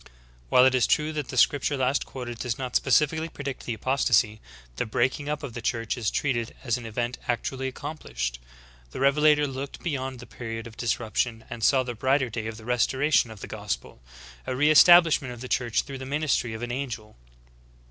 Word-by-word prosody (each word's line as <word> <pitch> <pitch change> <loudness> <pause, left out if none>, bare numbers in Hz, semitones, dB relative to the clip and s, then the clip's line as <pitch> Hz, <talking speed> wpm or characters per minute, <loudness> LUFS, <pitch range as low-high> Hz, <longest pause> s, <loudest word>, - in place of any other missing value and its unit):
"^' - - -20
36. - - -22 0.3
While 125 - +6
it 130 - +4
is 130 -2 +3
true 155 +1 +1
that 150 -3 -3
the 130 - -6
scripture 140 +3 +3
last 130 +1 0
quoted 120 -3 -7
does 120 -3 -2
not 130 -2 -5
specifically 155 +4 +2
predict 140 -3 -6
the 115 - -1
apostasy, 110 -3 +1 0.4
the - - -1
breaking 130 +6 0
up 150 0 -3
of 135 -5 -6
the 120 - -6
Church 115 -1 -1
is 115 -4 -1
treated 120 -5 -1
as 120 -4 +1
an 120 -2 -6
event 120 +2 -3
actually 130 +2 -2
accomplished. 60 - -5 0.5
The - - -8
Revelator 150 +2 +4
looked 135 0 -6
beyond 135 -5 -3
the 125 - -10
period 115 -2 -6
of 115 -1 -10
disruption 115 0 -1
and 120 -2 -6
saw 130 +2 +4
the 125 -1 -4
brighter 130 +1 +1
day 110 0 -4
of 110 -1 -6
the 110 - -12
restoration 125 +3 +2
of 110 -3 -11
the - - -5
gospel - - -5 0.2
— - - -18
a - - -1
re 150 +4 +4
establishment 165 -6 +6
of 120 - -13
the 130 - -6
Church 120 -3 0
through 135 -2 -8
the 130 - -6
ministry 140 -5 0
of 110 - -6
an 120 - -3
angel. 120 -5 -5
125 Hz, 210 wpm, -26 LUFS, 115-140 Hz, 0.5 s, While